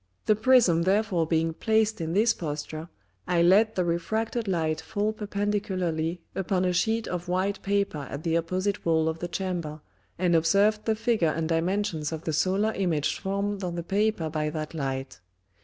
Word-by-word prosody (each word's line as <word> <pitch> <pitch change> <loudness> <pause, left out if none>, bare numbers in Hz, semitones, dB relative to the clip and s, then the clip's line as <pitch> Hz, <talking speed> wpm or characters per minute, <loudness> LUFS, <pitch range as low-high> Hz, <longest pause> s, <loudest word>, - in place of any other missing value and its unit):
The 215 - +4
Prism 220 -7 +4
therefore 190 -2 +1
being 165 0 +1
placed 220 +1 +1
in 165 0 -2
this 220 +4 +4
Posture, 155 +1 -5 0.4
I 175 -1 +3
let 210 +5 +5
the 180 - +1
refracted 220 +7 -1
Light 160 -4 0
fall 210 +5 -1
perpendicularly 190 -5 -2
upon 185 -1 0
a 180 - +1
Sheet 220 +5 +1
of 175 0 -4
white 190 +3 -1
Paper 200 -8 -1
at 140 +3 -6
the 165 -1 0
opposite 185 +4 -1
Wall 160 -1 +2
of 160 0 -2
the 175 - -3
Chamber, 175 -4 -3 0.4
and 175 -1 +2
observed 200 +6 +3
the 220 - +2
Figure 220 -7 +1
and 160 +1 -1
Dimensions 165 -1 -1
of 160 0 -5
the 160 - -2
Solar 195 +7 +1
Image 165 -6 0
formed 200 0 -2
on 175 -1 -3
the 170 - -3
Paper 200 -2 0
by 150 -1 -1
that 155 0 -5
Light. 135 - -4
180 Hz, 175 wpm, -27 LUFS, 160-205 Hz, 0.4 s, let